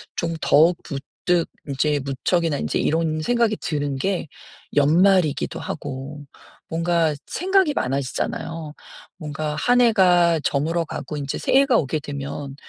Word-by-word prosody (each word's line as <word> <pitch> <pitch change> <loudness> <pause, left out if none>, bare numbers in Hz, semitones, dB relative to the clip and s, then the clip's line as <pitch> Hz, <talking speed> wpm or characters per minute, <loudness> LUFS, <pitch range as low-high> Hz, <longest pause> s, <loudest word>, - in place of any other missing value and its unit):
좀 165 0 -2
더 165 +4 +5
부뜩 165 +5 -2 0.2
인제 145 +1 0
무척이나 145 +3 0
인제 - - -2
이런 155 0 0
생각이 235 +2 +1
드는 145 -4 -2
게 185 +1 -1 0.5
연말이기도 165 +3 +3
하고 140 +3 -6 0.4
뭔가 165 -1 +1
생각이 375 -4 +2
많아지잖아요. 150 +4 -3 0.4
뭔가 150 -1 -4
한 245 +9 +3
해가 180 -7 +4
저물어가고 155 +1 -2
인제 140 -1 -3
새해가 270 -3 +3
오게 150 +2 -1
되면 140 -1 -6
160 Hz, 270 characters per minute, -22 LUFS, 145-180 Hz, 0.5 s, 더